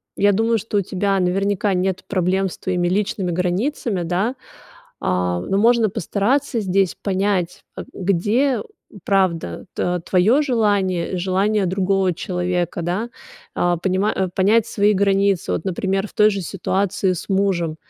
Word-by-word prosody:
я 205 0 +3
думаю, 225 +3 +2
что 210 0 -3
у - - +3
тебя 195 +1 -1
наверняка 195 +2 0
нет 185 0 -1
проблем 190 0 +1
с - - -10
твоими 180 -1 -1
личными 190 -1 -1
границами, 185 - -1
да, 180 +8 0
э, - - -12 0.7
но 90 - 0
можно 230 +1 +4
постараться 230 - 0
здесь 190 -2 +1
понять, 190 -2 -1
э, - - -6
где 205 +9 +1 0.4
правда 175 - 0
т 180 0 -1
твоё 210 +11 +4
желание, 205 - 0
желание 190 +3 +1
другого 190 0 +1
человека, 180 -1 -2
да, 185 +8 -2 0.5
э, 175 0 +2
понимать 190 +2 0
э, 190 -1 0
понять 215 +4 +3
свои 205 -1 +2
границы. 195 -1 +1
Вот, - - -2
например, 195 +2 -1
в - - -16
той 210 0 +4
же 200 -1 -3
ситуации 190 +1 -1
с 175 - -8
мужем. 190 -5 0
195 Hz, 145 wpm, -20 LUFS, 180-205 Hz, 0.7 s, можно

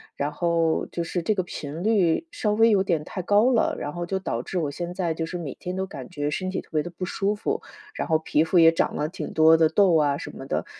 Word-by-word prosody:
然 145 +1 -2
后， 165 0 0
就 170 - -4
是 175 +1 -3
这 210 +5 0
个 185 - 0
频 160 0 -6
率 205 - +2
稍 210 -3 -1
微 225 +1 +5
有 195 -2 +3
点 165 -5 0
太 185 - -5
高 210 +7 +3
了。 230 - +2
然 145 - -5
后 175 0 -4
就 190 +1 -1
导 120 -11 -3
致 180 - -5
我 150 -5 -1
现 175 +4 -5
在 175 -3 -1
就 165 0 -3
是 180 - -5
每 155 -6 -5
天 180 +1 -6
都 190 0 -2
感 - - -9
觉 145 -4 -3
身 185 +5 -2
体 185 - -3
特 - - -25
别 155 -1 +1
地 175 - -6
不 180 +2 -5
舒 200 +3 -1
服， 420 - -2 0.3
然 - - -4
后 160 -1 +3
皮 155 -1 +1
肤 165 +3 +1
也 165 -1 +8
长 165 - 0
了 150 - -1
挺 180 - -6
多 160 0 +6
的 160 -1 +4
痘 185 0 +4
啊 145 -2 +2
什 - - -7
么 - - -10
的。 - - -2
175 Hz, 295 characters per minute, -25 LUFS, 160-190 Hz, 0.3 s, 也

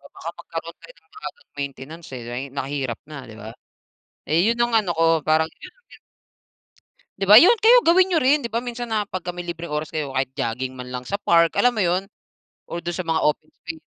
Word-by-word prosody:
baka - - -6
magkaroon - - -7
tayo - - -14
ng 420 - -29
maagang 455 +3 -10
maintenance, 140 +4 -7
eh, 120 - -9
ay 120 +2 -4
mahirap 135 -3 -4
na, 150 -1 -9
di 110 - -11
ba? 110 +2 -9 0.7
Eh 155 +4 +3
,yun 235 +1 +1
ang 240 0 +1
ano 210 -5 +2
ko, 165 - +3 0.2
parang 160 +1 +2
yun - - -11
ang - - -34
gina - - -16 1.2
Di 195 - -1
ba, 210 - +9
yun. 355 - +9
Kayo 475 +3 +6
gawin 365 +3 +5
niyo 350 -4 +2
rin. 280 +4 +4
Di - - -2
ba 230 +2 -1
minsan 240 0 -5
na 215 -1 +1
pagka 180 -3 -6
may 175 - -5
libreng 170 -1 -6
oras 150 0 -3
kayo 150 -4 -4
kahit 130 0 0
jogging 130 +1 -3
man 125 0 -7
lang 125 0 -4
sa 200 +9 -3
park, 170 -4 +3
alam 245 0 +4
mo 215 - +1
yun, 180 +2 0 0.6
or 170 - -4
dun 175 0 -3
sa 185 -1 -5
mga 165 0 +1
open 150 +1 0
space. 165 -2 -9
170 Hz, 225 wpm, -22 LUFS, 140-230 Hz, 1.2 s, ba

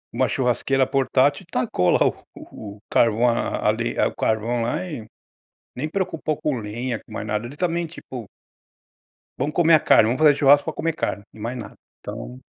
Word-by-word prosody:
uma - - +2
churrasqueira 130 +1 +1
portátil 135 +3 +2
e 170 - -23
tacou 90 -7 +1
lá - - +4
o - - 0 0.2
o 100 -2 -10
o - - -22
carvão 115 +1 +3
a 115 -2 0
a - - +6
le 115 +2 -3
o - - +1
carvão 115 +2 0
lá 150 +10 -1
e 125 -10 -7 0.7
nem 140 +5 -3
preocupou 165 -4 -2
com 150 -2 -1
lenha, 115 +3 -4
com - - -24
mais 110 - -5
nada. 105 +2 -2
Ele 135 +4 -10
também, 170 0 0
tipo 130 -7 -9 1.1
"vamos 145 +4 -2
comer 165 -1 +5
a 155 - +6
carne, - - +5
vamos 120 - 0
fazer 150 -2 +6
churrasco 145 0 +5
pra 160 - -2
comer 165 -1 -1
carne." 100 - -3
e - - -16
mais 115 +4 -4
nada, 115 - -8 0.2
então. 60 +2 -8
125 Hz, 195 wpm, -23 LUFS, 110-150 Hz, 1.1 s, a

